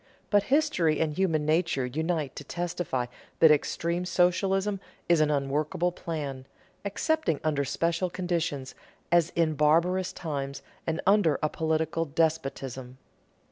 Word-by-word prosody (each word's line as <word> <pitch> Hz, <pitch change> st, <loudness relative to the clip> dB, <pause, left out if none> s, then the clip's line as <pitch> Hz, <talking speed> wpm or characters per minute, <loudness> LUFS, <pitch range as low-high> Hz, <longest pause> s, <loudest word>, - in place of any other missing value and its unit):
But 205 Hz, -1 st, +5 dB
history 260 Hz, -, +2 dB
and 155 Hz, -2 st, 0 dB
human 165 Hz, -5 st, +1 dB
nature 155 Hz, -4 st, +1 dB
unite 155 Hz, +1 st, -2 dB
to -, -, -6 dB
testify 170 Hz, -5 st, -2 dB, 0.3 s
that 160 Hz, -, +7 dB
extreme 170 Hz, +3 st, 0 dB
socialism 190 Hz, +3 st, +1 dB, 0.3 s
is 170 Hz, -2 st, +4 dB
an 155 Hz, -, +3 dB
unworkable 150 Hz, +4 st, 0 dB
plan, 145 Hz, -6 st, -5 dB, 0.4 s
excepting 200 Hz, -, 0 dB
under 150 Hz, -3 st, +1 dB
special 170 Hz, +6 st, 0 dB
conditions, 170 Hz, -7 st, -2 dB, 0.4 s
as 170 Hz, -1 st, +4 dB
in 165 Hz, -2 st, +2 dB
barbarous 170 Hz, +5 st, +2 dB
times 140 Hz, -4 st, -5 dB, 0.2 s
and 165 Hz, +1 st, -1 dB
under 195 Hz, -6 st, +4 dB
a 155 Hz, -, +2 dB
political 160 Hz, +1 st, 0 dB
despotism. 135 Hz, -5 st, -2 dB
160 Hz, 125 wpm, -28 LUFS, 150-175 Hz, 0.4 s, that